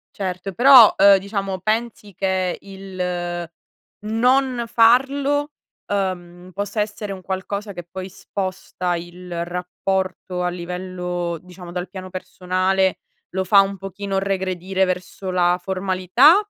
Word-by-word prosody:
Certo. 185 Hz, 0 st, -4 dB
Però, 245 Hz, +1 st, +9 dB
uhm, 200 Hz, 0 st, +8 dB
diciamo 195 Hz, -1 st, -3 dB
pensi 215 Hz, 0 st, -2 dB
che 185 Hz, -1 st, 0 dB
il 180 Hz, -3 st, -4 dB, 0.5 s
non 250 Hz, +3 st, +2 dB
farlo, 275 Hz, +6 st, +3 dB, 0.3 s
uhm, 180 Hz, -3 st, -3 dB
possa 205 Hz, +3 st, -2 dB
essere 210 Hz, -1 st, -3 dB
un 190 Hz, -1 st, -8 dB
qualcosa 200 Hz, +2 st, -4 dB
che 175 Hz, -2 st, -7 dB
poi 185 Hz, +1 st, -6 dB
sposta 185 Hz, -2 st, -3 dB
il 175 Hz, 0 st, -6 dB
rapporto 180 Hz, +1 st, -3 dB
a 180 Hz, -, +1 dB
livello, 180 Hz, -1 st, -4 dB
diciamo, 180 Hz, 0 st, -11 dB
dal 180 Hz, +1 st, -4 dB
piano 185 Hz, -1 st, -8 dB
personale 185 Hz, +1 st, 0 dB, 0.3 s
lo 190 Hz, +1 st, -1 dB
fa 200 Hz, +2 st, +7 dB
un 195 Hz, 0 st, 0 dB
pochino 195 Hz, 0 st, -4 dB
regredire 190 Hz, -1 st, 0 dB
verso 185 Hz, +1 st, -3 dB
la 180 Hz, -1 st, +3 dB
formalità? 190 Hz, -, +4 dB
190 Hz, 120 wpm, -22 LUFS, 180-200 Hz, 0.5 s, Però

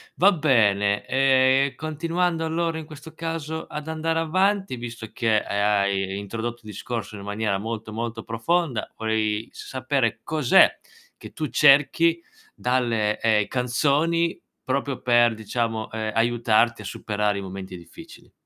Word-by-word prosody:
Va 200 Hz, +3 st, +5 dB
bene, 105 Hz, -, +2 dB
ehm, 135 Hz, +1 st, +3 dB
continuando 165 Hz, +2 st, -1 dB
allora 165 Hz, 0 st, -1 dB
in 160 Hz, -, -6 dB
questo 155 Hz, 0 st, -12 dB
caso 160 Hz, -1 st, -4 dB
ad 150 Hz, +1 st, -7 dB
andare 160 Hz, +1 st, -1 dB
avanti, 190 Hz, 0 st, +1 dB
visto 120 Hz, -2 st, -7 dB
che, 110 Hz, -2 st, +2 dB
ehm, -, -, 0 dB
hai 100 Hz, -1 st, 0 dB
introdotto 115 Hz, +4 st, -5 dB
il 105 Hz, -, -9 dB
discorso 110 Hz, 0 st, -5 dB
in 100 Hz, -, -9 dB
maniera 100 Hz, 0 st, -1 dB
molto, 110 Hz, +1 st, -5 dB
molto 115 Hz, 0 st, -4 dB
profonda, 125 Hz, +3 st, -1 dB
vorrei 110 Hz, -1 st, -1 dB
sapere 130 Hz, -3 st, -2 dB
cos'è 150 Hz, -6 st, +4 dB, 0.4 s
che -, -, -11 dB
tu 155 Hz, -, -3 dB
cerchi 150 Hz, +4 st, +4 dB, 0.3 s
dalle, 120 Hz, -4 st, 0 dB
ehm, 110 Hz, -2 st, +2 dB
canzoni 145 Hz, +7 st, +1 dB, 0.2 s
proprio 135 Hz, 0 st, -2 dB
per 120 Hz, -1 st, +4 dB
diciamo, 110 Hz, 0 st, -3 dB
ehm, 110 Hz, -1 st, -3 dB
aiutarti 115 Hz, 0 st, +2 dB
a -, -, -10 dB
superare 105 Hz, +1 st, -2 dB
i -, -, -5 dB
momenti 95 Hz, -1 st, -7 dB
difficili? 85 Hz, -1 st, -14 dB
120 Hz, 135 wpm, -24 LUFS, 110-155 Hz, 0.4 s, Va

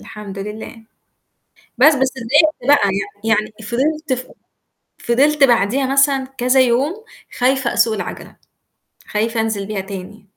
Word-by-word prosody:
الحمد 205 Hz, -2 st, -9 dB
لله. 210 Hz, +3 st, -7 dB, 1.0 s
بس 295 Hz, +4 st, +6 dB
بس 265 Hz, -1 st, +1 dB
اتضايقت 300 Hz, +7 st, +2 dB
بقى 280 Hz, -9 st, +4 dB, 0.3 s
يعني 225 Hz, -, -2 dB
يعني 215 Hz, 0 st, -8 dB
فِضِلت 285 Hz, +6 st, -1 dB
ف 255 Hz, 0 st, -5 dB, 0.7 s
فِضِلت 285 Hz, +5 st, +2 dB
بعديها 245 Hz, +1 st, +3 dB
مثلًا 275 Hz, -1 st, +3 dB
كذا 255 Hz, +2 st, +2 dB
يوم 275 Hz, -, 0 dB, 0.4 s
خايفة 260 Hz, 0 st, +1 dB
أسوق 225 Hz, -, +2 dB
العَجَلة، -, -, -7 dB, 0.7 s
خايفة 225 Hz, +2 st, -1 dB
أنزِل 215 Hz, -3 st, -2 dB
بيها 210 Hz, -2 st, -4 dB
تاني. 195 Hz, +2 st, -9 dB
245 Hz, 125 wpm, -18 LUFS, 215-275 Hz, 1.0 s, بس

